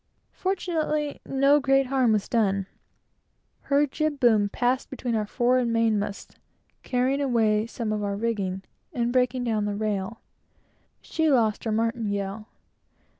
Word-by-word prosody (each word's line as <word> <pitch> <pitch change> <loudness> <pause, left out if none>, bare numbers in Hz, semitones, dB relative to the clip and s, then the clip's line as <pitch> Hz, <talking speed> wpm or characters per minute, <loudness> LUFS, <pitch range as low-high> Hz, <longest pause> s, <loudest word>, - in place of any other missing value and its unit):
Fortunately 315 -6 -2
no 275 +2 +4
great 270 -1 +3
harm 260 -3 +2
was 210 -2 +1
done. 200 -4 +1 1.0
Her 285 +1 +4
jib 300 +1 -2
boom 220 -5 +4
ran 245 +1 +3
between 250 -3 -4
our 215 -2 0
fore 250 +3 +2
and 240 -2 0
main 230 -2 +2
masts, 200 0 -6 0.4
carrying 260 +3 0
away 225 -5 +2
some 230 -2 -3
of 210 -1 -2
our 200 -1 -1
rigging, 200 -4 -2 0.3
and 240 0 -1
breaking 250 0 +1
down 220 -3 0
the 205 -1 -2
rail. 210 0 -3 0.8
She 320 -1 0
lost 230 -6 +2
her 220 - 0
martingale. 215 -2 -2
230 Hz, 140 wpm, -26 LUFS, 215-265 Hz, 1.0 s, no